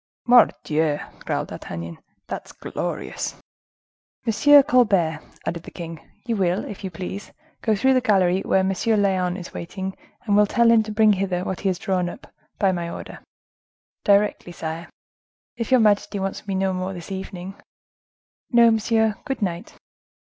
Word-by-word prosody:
"Mordioux!" 160 -11 +4 0.3
growled - - -2
D'Artagnan, 85 0 -7 0.3
"that's - - -7
glorious!" - - -4 0.9
"Monsieur 285 +6 +6
Colbert," 200 - +3 0.3
added 170 -1 -3
the - - -10
king, 165 -2 -8 0.3
"you 235 -2 -1
will, 185 -1 0
if 205 - -8
you 190 - -3
please, 185 +3 -7 0.3
go 220 -2 +2
through 265 +6 +3
the 255 - +3
gallery 190 -5 +3
where 190 - +2
M. 190 +1 +1 0.3
Lyonne 185 -2 +1
is 180 -2 -9
waiting, 190 +2 -5 0.3
and 205 -2 +2
will 210 0 +5
tell 235 +2 +4
him 230 -1 +6
to 215 0 -5
bring 215 0 +5
hither 185 -2 -1
what 190 -1 -3
he 195 - 0
has 185 - -1
drawn 185 -2 -1
up—by 195 +2 -4
my 170 -2 -3
order." - - -8 0.8
"Directly, 200 -3 +2
sire; 165 0 -6 0.7
if 230 -1 -4
your 260 -1 +5
majesty 205 -1 +2
wants 195 +2 -4
me 195 - -1
no 190 0 +1
more 185 +1 -3
this 175 +1 -9
evening?" 190 -1 -6 1.0
"No, 235 -1 +6
monsieur: 220 0 +2
good 270 -6 -3
night!" 175 -2 -4
195 Hz, 155 wpm, -23 LUFS, 180-220 Hz, 1.0 s, Monsieur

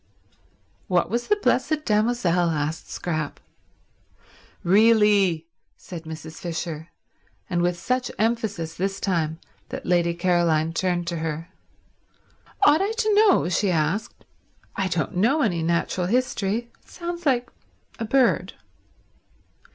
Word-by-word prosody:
"What 180 0 +1
was 240 +1 -1
the 420 - +4
Blessed 310 -6 0
Damozel?" 210 -6 +2
asked 155 0 -2
Scrap. 155 -4 -3 1.2
"Really—" 205 -4 +4 0.3
said 170 -3 -9
Mrs. 160 0 -8
Fisher; 165 -2 -4 0.6
and 175 -1 0
with 175 0 +1
such 250 +6 -1
emphasis 210 -7 -1
this 195 +3 -2
time 160 -5 -1 0.3
that - - -6
Lady 170 -1 +2
Caroline 170 -2 +2
turned 175 0 0
to 170 0 -3
her. 160 +1 -4 1.1
"Ought 300 +1 +6
I 405 +3 0
to 440 -2 +1
know?" 410 - +5
she 185 +3 +1
asked. 175 +5 -1 0.5
"I 195 -2 0
don't 165 -2 -2
know 270 - +3
any 175 -7 0
natural 170 +2 0
history. 235 0 -1
It - - -26
sounds 345 -1 -5
like 245 -2 +1 0.5
a 225 - -2
bird." 255 +2 +2
185 Hz, 120 wpm, -24 LUFS, 165-235 Hz, 1.2 s, Ought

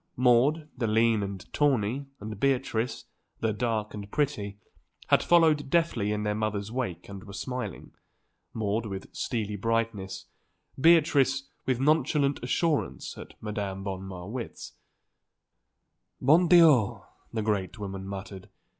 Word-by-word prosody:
Maude, 130 +6 +3
the 120 -3 -1
lean 110 0 +3
and 100 -2 -5
tawny, 135 -2 +1
and 105 -1 -7
Beatrice, 130 -3 0 0.3
the 110 -1 0
dark 110 -1 -1
and 100 -1 -7
pretty, 105 -8 -1 0.5
had - - +5
followed 160 -5 +4
deftly 150 -12 +1
in 105 0 -1
their 105 0 0
mother's 105 -1 -2
wake 115 -9 -3
and 100 -1 -9
were 100 -2 -11
smiling, 110 +1 -5 0.6
Maude 110 0 -1
with 95 -1 -7
steely 105 -3 -2
brightness, 115 -2 -2 0.5
Beatrice 140 -4 +4 0.2
with 130 -2 +1
nonchalant 145 -1 +2
assurance, 150 +4 -1
at - - -11
Madame 100 -3 -4
von 95 -1 -4
Marwitz. 95 +5 -7 1.5
"Bon 160 +7 +5
Dieu!" 160 - +5 0.3
the 110 -2 -2
great 105 -2 -1
woman 95 -2 -6
muttered. 100 -1 -7
110 Hz, 125 wpm, -28 LUFS, 100-135 Hz, 1.5 s, had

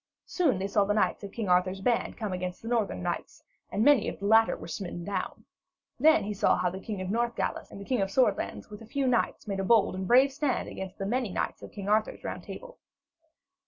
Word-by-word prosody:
Soon 315 - +1
they 190 - -2
saw 200 +1 +3
the 205 +1 0
knights 210 - +1
of 200 - -6
King 220 -1 -4
Arthur's 185 +1 +2
band 235 +4 0
come 210 -4 -3
against 180 +1 -5
the - - -7
northern 220 - 0
knights, - - -4 0.3
and 210 - +1
many 285 -6 +5
of - - -7
the 200 - -6
latter 225 +2 +5
were - - -9
smitten 175 +1 -5
down. 190 +1 -4 0.5
Then 315 +1 +5
he 210 +1 -3
saw 200 - +3
how 180 - 0
the 190 - -6
King 205 -1 -5
of 185 0 -3
the - - -1
Northgales 235 -5 -1
and - - -10
the 200 - -8
King 250 -2 0
of 195 - 0
Swordlands 210 -2 0
with 210 - -9
a 225 - -11
few 275 +3 -1
knights 245 -3 0
made 195 -1 -2
a - - 0
bold 220 +1 +4
and 190 0 -4
brave 260 +5 +6
stand 280 -2 -1
against 190 0 -7
the 195 - -3
many 240 +2 0
knights - - -3
of - - -10
King 200 -2 -7
Arthur's 215 +1 +1
Round - - -5
Table. - - -10
205 Hz, 240 wpm, -28 LUFS, 190-240 Hz, 0.5 s, brave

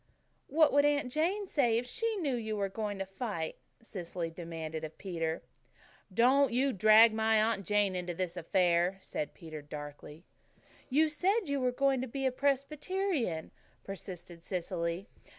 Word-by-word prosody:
"What 310 +1 +4
would 285 0 +5
Aunt 290 -3 +2
Jane 360 +8 0
say 250 -10 +2
if 240 - -1
she 455 - -1
knew 310 -9 -1
you 220 -3 -2
were 200 -1 0
going 205 0 -3
to 195 - -3
fight?" 195 -4 -4 0.3
Cecily 175 -5 -5
demanded 160 -2 -6
of 155 0 -7
Peter. 165 -4 -3 0.7
"Don't 255 +6 +4
you 260 +3 +2
drag 215 +3 +7
my 220 0 +3
Aunt 215 -4 +1
Jane 205 -2 +2
into 175 -1 -3
this 185 -1 -2
affair," 175 +1 +2
said 150 - -4
Peter 155 -2 -8
darkly. 145 +2 -9 0.6
"You 305 +4 +4
said 375 +7 +1
you 280 0 +1
were 250 -1 +1
going 270 0 +2
to 260 - -3
be 270 +3 -3
a 260 - +3
Presbyterian," 280 - -1 0.3
persisted 180 -3 -8
Cecily. 175 0 -3
215 Hz, 155 wpm, -32 LUFS, 175-275 Hz, 0.7 s, drag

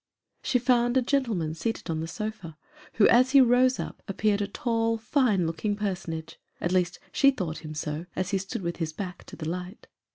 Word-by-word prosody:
She 255 - +2
found 245 0 +2
a 260 - +3
gentleman 230 - 0
seated 225 +8 -3
on 160 -1 -2
the 160 - -3
sofa, 190 -4 -6 0.4
who, 215 - +5
as 255 +3 +5
he 280 - +9
rose 255 +1 +4
up, - - -6
appeared 205 +1 +1
a 200 - -1
tall, 230 +1 0
fine 225 - +2
looking 165 +6 -1
personage; 175 -6 -4 0.2
at 175 - -1
least 180 -1 +1
she 275 - +5
thought 185 - -3
him 155 -1 -8
so, 155 +2 -4
as 185 +2 -2
he 195 - +1
stood 195 0 -5
with 170 0 -3
his 160 -2 -3
back 180 +1 -6
to - - -10
the 155 - -6
light. 180 +4 -5
200 Hz, 200 wpm, -27 LUFS, 170-235 Hz, 0.4 s, he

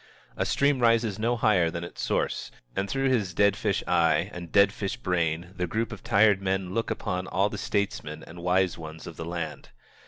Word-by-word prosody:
A - - -1
stream 140 -1 +2
rises 115 -3 +2
no 120 +2 +1
higher 95 -7 +3
than 85 +1 -5
its 85 - -7
source, - - -1 0.3
and 100 +1 -1
through 135 0 +1
his 105 -8 0
dead 100 0 +4
fish - - -1
eye 85 -1 +2
and 85 -2 -8
dead 100 0 +5
fish 100 -2 -3
brain 85 0 -1
the 90 -1 -2
group 115 +7 -2
of - - -8
tired 100 -2 +4
men 95 -1 -1
look 115 +1 -1
upon 95 -4 -3
all 100 +2 +1
the - - -6
statesmen 100 - -2
and 85 +1 -11
wise 90 0 +1
ones 80 0 -8
of 85 - -8
the 80 - -6
land. 85 -3 -5
95 Hz, 200 wpm, -27 LUFS, 85-105 Hz, 0.3 s, dead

